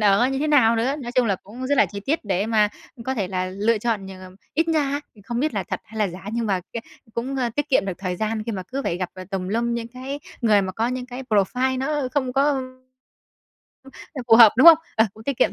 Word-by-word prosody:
ở 210 Hz, +4 st, +4 dB
như 270 Hz, 0 st, -2 dB
thế 305 Hz, -, 0 dB
nào 240 Hz, -7 st, +4 dB
nữa. 255 Hz, +5 st, +1 dB
Nói 240 Hz, 0 st, -6 dB
chung 250 Hz, -2 st, +3 dB
là 195 Hz, -3 st, +1 dB
cũng 245 Hz, +6 st, -7 dB
rất 285 Hz, 0 st, +1 dB
là -, -, +6 dB
chi 200 Hz, 0 st, -7 dB
tiết 275 Hz, +5 st, -1 dB
để 195 Hz, +1 st, 0 dB
mà, 215 Hz, -2 st, +3 dB, 0.3 s
ừm, 230 Hz, -, -10 dB
có 265 Hz, -, -1 dB
thể 200 Hz, -6 st, -2 dB
là 185 Hz, -1 st, -2 dB
lựa 210 Hz, +4 st, 0 dB
chọn 215 Hz, -3 st, -2 dB
nh 190 Hz, -, -8 dB, 0.4 s
ít 325 Hz, +2 st, +1 dB
nha 290 Hz, -3 st, +1 dB
thì 205 Hz, -, -17 dB
không 240 Hz, +2 st, -3 dB
biết 300 Hz, -5 st, 0 dB
là 195 Hz, -, 0 dB
thật -, -, -4 dB
hay 220 Hz, +1 st, -10 dB
là 210 Hz, -2 st, +2 dB
giả, 180 Hz, +2 st, -10 dB
nhưng 235 Hz, -1 st, -1 dB
mà 190 Hz, -3 st, 0 dB
c -, -, -24 dB, 0.5 s
cũng, 260 Hz, +4 st, -3 dB
ơ, 245 Hz, -2 st, 0 dB
tiết 290 Hz, 0 st, -1 dB
kiệm 260 Hz, -, +3 dB
được 185 Hz, -, -4 dB
thời 180 Hz, -2 st, -3 dB
gian, 215 Hz, +1 st, -2 dB
khi 230 Hz, -, -2 dB
mà 190 Hz, -2 st, -4 dB
cứ 270 Hz, +2 st, -3 dB
phải 170 Hz, -, -1 dB
gặp, 180 Hz, -1 st, -3 dB
ờ, 185 Hz, 0 st, -8 dB
tùm 185 Hz, -1 st, -3 dB
lum 235 Hz, +3 st, 0 dB
những 230 Hz, 0 st, -4 dB
cái 260 Hz, +4 st, -7 dB, 0.2 s
người 210 Hz, -4 st, +4 dB
mà 190 Hz, -, -4 dB
có 225 Hz, +5 st, -1 dB
những 250 Hz, 0 st, -4 dB
cái 250 Hz, +1 st, -7 dB
profile 250 Hz, +3 st, +1 dB
nó 280 Hz, -1 st, -1 dB
không 260 Hz, -3 st, 0 dB
có, 275 Hz, +2 st, +3 dB
ưm 265 Hz, -2 st, -1 dB, 1.5 s
ờ, 260 Hz, -, -4 dB
phù 225 Hz, -, +8 dB
hợp, 225 Hz, -3 st, +9 dB
đúng 260 Hz, -, +6 dB
không? 330 Hz, -2 st, +11 dB, 0.2 s
Ờ, 220 Hz, -, +5 dB
cũng 220 Hz, -, -13 dB
tiết 280 Hz, -3 st, -2 dB
kiệm -, -, +3 dB
235 Hz, 275 wpm, -23 LUFS, 205-265 Hz, 1.5 s, không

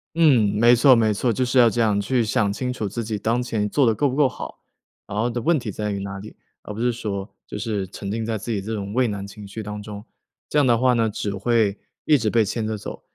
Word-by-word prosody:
嗯， 145 Hz, -10 st, +5 dB
没 120 Hz, +2 st, +6 dB
错 130 Hz, +2 st, +6 dB
没 110 Hz, -2 st, +3 dB
错， 115 Hz, +3 st, 0 dB
就 130 Hz, -, 0 dB
是 125 Hz, +1 st, 0 dB
要 120 Hz, -2 st, +7 dB
这 120 Hz, -, 0 dB
样 105 Hz, -2 st, +2 dB
去 120 Hz, +4 st, +1 dB
想 105 Hz, -2 st, +1 dB
清 125 Hz, +4 st, -3 dB
楚 110 Hz, -5 st, -3 dB
自 115 Hz, +4 st, -4 dB
己 110 Hz, -1 st, -3 dB
当 115 Hz, +4 st, 0 dB
前 110 Hz, -4 st, -1 dB
做 140 Hz, +6 st, +1 dB
得 110 Hz, -, +3 dB
够 145 Hz, +7 st, +2 dB
不 130 Hz, -, -2 dB
够 145 Hz, -2 st, +4 dB
好。 -, -, -9 dB, 0.5 s
然 105 Hz, -, -5 dB
后 115 Hz, -, +1 dB
的 120 Hz, 0 st, -3 dB
问 165 Hz, +6 st, +3 dB
题 120 Hz, -6 st, -4 dB
在 105 Hz, +2 st, -3 dB
于 100 Hz, -1 st, -2 dB
哪 100 Hz, 0 st, -6 dB
里， 105 Hz, +2 st, -11 dB, 0.3 s
而 -, -, -9 dB
不 105 Hz, -, -7 dB
是 120 Hz, +1 st, +2 dB
说， 105 Hz, -4 st, -4 dB, 0.2 s
就 -, -, -6 dB
是 105 Hz, -3 st, -2 dB
沉 100 Hz, +1 st, -6 dB
浸 115 Hz, +1 st, -2 dB
在 110 Hz, 0 st, -2 dB
自 110 Hz, +3 st, -5 dB
己 105 Hz, -3 st, -1 dB
这 110 Hz, +3 st, -4 dB
种 100 Hz, 0 st, -5 dB
畏 125 Hz, 0 st, +2 dB
难 100 Hz, -2 st, -4 dB
情 100 Hz, 0 st, -10 dB
绪 110 Hz, +3 st, -7 dB
当 105 Hz, 0 st, -6 dB
中。 105 Hz, 0 st, -9 dB, 0.4 s
这 150 Hz, -, +1 dB
样 140 Hz, -, +3 dB
的 120 Hz, -1 st, +4 dB
话 125 Hz, +1 st, +3 dB
呢， 115 Hz, -2 st, +2 dB
只 105 Hz, -1 st, -3 dB
会 105 Hz, 0 st, +1 dB, 0.3 s
一 155 Hz, -, +5 dB
直 115 Hz, -6 st, +1 dB
被 115 Hz, 0 st, +3 dB
牵 110 Hz, +2 st, -2 dB
着 110 Hz, 0 st, -2 dB
走。 -, -, -8 dB
110 Hz, 295 characters per minute, -23 LUFS, 105-120 Hz, 0.5 s, 要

